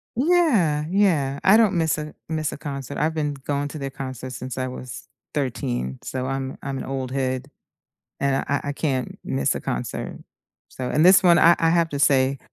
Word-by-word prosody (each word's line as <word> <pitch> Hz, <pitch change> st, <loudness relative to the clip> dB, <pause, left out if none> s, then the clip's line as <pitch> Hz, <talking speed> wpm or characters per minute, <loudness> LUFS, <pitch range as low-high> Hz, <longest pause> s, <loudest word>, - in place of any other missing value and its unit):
Yeah, 235 Hz, -, +3 dB
yeah. 155 Hz, -9 st, +2 dB
I 200 Hz, +4 st, +7 dB
don't 220 Hz, -4 st, +4 dB
miss 165 Hz, -3 st, +1 dB
a 150 Hz, 0 st, -6 dB, 0.2 s
miss 155 Hz, -2 st, -1 dB
a -, -, -7 dB
concert. 140 Hz, -2 st, -6 dB
I've 160 Hz, +2 st, 0 dB
been 150 Hz, -2 st, -1 dB
going 140 Hz, +1 st, -3 dB
to 155 Hz, -, -7 dB
their 135 Hz, -1 st, -3 dB
concert 130 Hz, -1 st, -7 dB
since 125 Hz, +1 st, -6 dB
I 130 Hz, -, -1 dB
was 125 Hz, -1 st, -8 dB, 0.3 s
13, 65 Hz, -, -2 dB
so 130 Hz, 0 st, -3 dB
I'm 135 Hz, 0 st, -3 dB
I'm 140 Hz, -1 st, -4 dB
an -, -, -4 dB
old 135 Hz, -1 st, -4 dB
head, 130 Hz, 0 st, -2 dB, 0.7 s
and 140 Hz, -1 st, +1 dB
I 140 Hz, -, +2 dB
I 145 Hz, -, -1 dB
can't 135 Hz, -4 st, -2 dB
miss 65 Hz, +1 st, 0 dB
a -, -, -5 dB
concert, -, -, -4 dB, 0.5 s
so 125 Hz, -1 st, -5 dB
and 155 Hz, -, +3 dB
this 185 Hz, +1 st, +8 dB
one, 175 Hz, -3 st, +6 dB
I 170 Hz, +1 st, +7 dB
I 165 Hz, -, +3 dB
have 170 Hz, 0 st, +2 dB
to 140 Hz, -2 st, -4 dB
say, 135 Hz, -1 st, +3 dB
140 Hz, 195 wpm, -23 LUFS, 130-160 Hz, 0.7 s, this